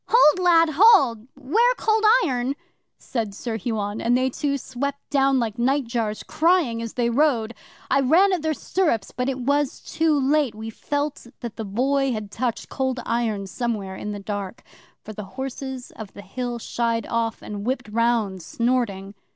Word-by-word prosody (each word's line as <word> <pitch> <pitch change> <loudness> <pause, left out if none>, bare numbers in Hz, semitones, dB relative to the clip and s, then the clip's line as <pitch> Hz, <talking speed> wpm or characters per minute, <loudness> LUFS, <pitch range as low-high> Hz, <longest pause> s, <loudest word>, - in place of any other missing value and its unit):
'"Hold, 370 -8 +5
lad, 335 -2 +5
hold! 275 - +6
'Ware 440 - +2
Cold 440 0 +1 0.2
Iron!" 255 -2 -1 0.4
said 220 -5 -4
Sir 230 +2 -4
Huon, 210 -1 -3
and 240 +2 +3
they 260 +1 +1
two 280 +2 -1
swept 275 +2 -4
down 275 -1 +3
like 225 -2 -2
nightjars, 235 -4 0
crying 320 -9 +2
as 230 -1 -5
they 235 -1 +1
rode. 240 -4 +2 0.4
'I 275 - +4
ran 350 +9 +4
at 355 - 0
their 315 0 0
stirrups, 295 - -1
but 250 +1 -2
it 265 - -2
was 285 +2 0
too 315 -2 +1
late. 275 -3 +2
We 220 +1 -6
felt 290 +2 -3
that 235 -3 -6
the 220 - -5
Boy 265 +6 +1
had 210 -2 -5
touched 240 -1 -2
Cold 260 -1 -2
Iron 225 -4 -1
somewhere 205 -2 -3
in 210 - -5
the 205 - -5
dark, 200 +1 -5 0.4
for 215 - -8
the 210 -1 -7
Horses 265 -1 -5
of 215 -3 -10
the 200 - -10
Hill 245 0 -4
shied 230 -1 -1
off, 230 -1 -2
and 205 -1 -6
whipped 250 +1 -2
round, 220 -4 0
snorting. 210 -2 -1
245 Hz, 170 wpm, -23 LUFS, 220-280 Hz, 0.4 s, hold